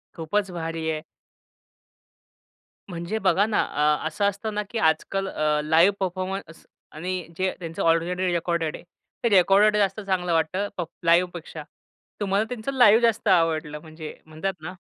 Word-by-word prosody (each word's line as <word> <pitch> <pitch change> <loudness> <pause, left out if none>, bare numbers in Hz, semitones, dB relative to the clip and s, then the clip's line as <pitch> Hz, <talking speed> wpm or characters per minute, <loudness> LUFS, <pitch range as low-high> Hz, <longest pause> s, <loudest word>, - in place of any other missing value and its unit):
खूपच 185 +4 -1
भारी 165 -2 -4
आहे. 155 - -3 1.9
म्हणजे 175 +4 -4
बघा 190 0 +3
ना 215 -1 0
अ, 150 +1 0
असं 180 +6 -1
असतं 210 +2 -5
ना 210 0 -1
की 235 - -4
आजकाल 175 +4 +1
अ, 150 -3 0
लाइव 165 +6 +5
परफॉर्मन्स 185 -2 -4 0.3
आणि 180 +2 -4
जे 185 0 0
त्यांचं 165 -2 -6
ऑलरेडी 175 +2 +1
रेकॉर्डेड 170 -2 -1
आहे. - - -11 0.4
ते 235 - +3
रेकॉर्डेड 200 +2 +5
जास्त 200 0 +1
चांगलं 185 -3 -1
वाटतं 175 +5 0
प 180 - -1 0.2
लाईव्हपेक्षा. 170 -2 +1 0.6
तुम्हाला 200 +1 +1
त्यांचं 250 +1 -4
लाईव्ह 230 -3 +6
जास्त 230 -1 +1
आवडलं, 160 -4 +2
म्हणजे 155 -1 -9
म्हणतात 160 +5 -4
ना. 180 +4 -6
180 Hz, 145 wpm, -24 LUFS, 160-200 Hz, 1.9 s, लाईव्ह